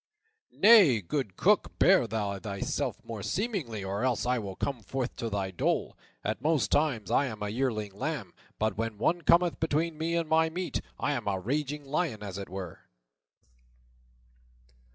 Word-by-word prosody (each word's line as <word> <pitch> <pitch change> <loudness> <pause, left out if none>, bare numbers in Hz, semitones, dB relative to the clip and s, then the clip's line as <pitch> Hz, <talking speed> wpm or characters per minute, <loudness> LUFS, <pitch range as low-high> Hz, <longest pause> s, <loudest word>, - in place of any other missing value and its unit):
"Nay, 195 - +7
good 105 - -3
Cook, 210 +3 +2
bear 185 -9 +5
thou 100 -2 -2
thyself 100 -1 -3
more 115 -3 -6
seemingly, 165 - -2
or 100 +3 -3
else 125 -2 +1
I 125 0 +1
will 100 -3 -6
come 135 +1 -3
forth 125 +5 -3
to 115 - -3
thy 100 -2 -2
dole. 90 - -1 0.3
At 110 +2 -2
most 155 -1 +1
times 135 - +1
I 140 - +3
am 110 -4 -6
as 105 - -2
a - - -4
yearling 110 -4 -1
lamb, 100 - -4 0.2
but 110 -2 0
when 115 -2 -2
one 170 +11 +1
cometh 175 0 +4
between 160 0 0
me 165 +1 0
and 170 -1 0
my 160 +1 +3
meat, 180 +2 -3 0.2
I - - 0
am 120 -7 -3
a 95 -2 0
raging 145 +7 -2
lion, 140 -6 -1
as 100 -1 -5
it 100 - -7
were." 95 -3 -6
125 Hz, 175 wpm, -29 LUFS, 105-160 Hz, 0.3 s, Nay